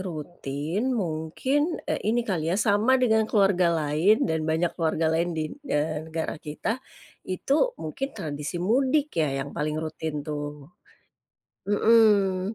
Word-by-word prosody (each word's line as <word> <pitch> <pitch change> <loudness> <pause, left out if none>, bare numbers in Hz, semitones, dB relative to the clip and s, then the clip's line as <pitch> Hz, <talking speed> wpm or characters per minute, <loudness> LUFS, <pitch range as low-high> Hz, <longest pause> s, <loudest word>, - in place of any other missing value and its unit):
rutin 170 - -3
mungkin, 220 - -1
eee, - - 0
ini 235 +2 +2
kali 165 -7 -1
ya, 185 - +1
sama 215 +4 +3
dengan 220 -2 +3
keluarga 195 -4 +3
lain, 160 +7 +2
dan 160 0 0
banyak 160 +2 +1
keluarga 160 0 +1
lain 170 +2 +1
di 155 - 0
n - - -8
eee, 155 -2 0
negara 160 0 -3
kita, 160 +11 -3 0.5
itu 280 - +1
mungkin 160 - -3
tradisi 150 -3 -4
mudik 265 +8 +2
ya, 135 -3 0
yang 140 - -8
paling 150 +1 -1
rutin 155 -1 -4
tuh. 145 0 -6 1.0
Mmm. 205 -2 +3
175 Hz, 140 wpm, -26 LUFS, 155-220 Hz, 1.0 s, sama